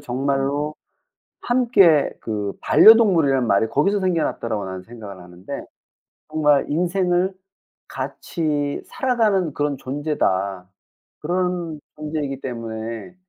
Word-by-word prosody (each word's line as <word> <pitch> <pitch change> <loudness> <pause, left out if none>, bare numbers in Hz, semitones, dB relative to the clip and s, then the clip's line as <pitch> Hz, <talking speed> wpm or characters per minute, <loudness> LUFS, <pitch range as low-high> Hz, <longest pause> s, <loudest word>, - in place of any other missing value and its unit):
정말로 140 +3 -1 0.7
함께 230 - +4
'그 105 -3 -3
반려동물이란 170 - +5
말이 100 +1 +3
거기서 195 - +1
생겨났다.'라고 155 - -1
나는 95 0 -6
생각을 100 -4 -11
하는데 90 +1 -9 0.6
정말 150 -2 +2
인생을 180 +3 +1 0.5
같이 145 -4 -3
살아가는 215 - 0
그런 145 -2 -1
존재다. 100 - -2 0.5
그런 175 -1 -2 0.2
존재이기 150 -3 -4
때문에 115 +4 -6
145 Hz, 255 characters per minute, -21 LUFS, 115-180 Hz, 0.7 s, 반려동물이란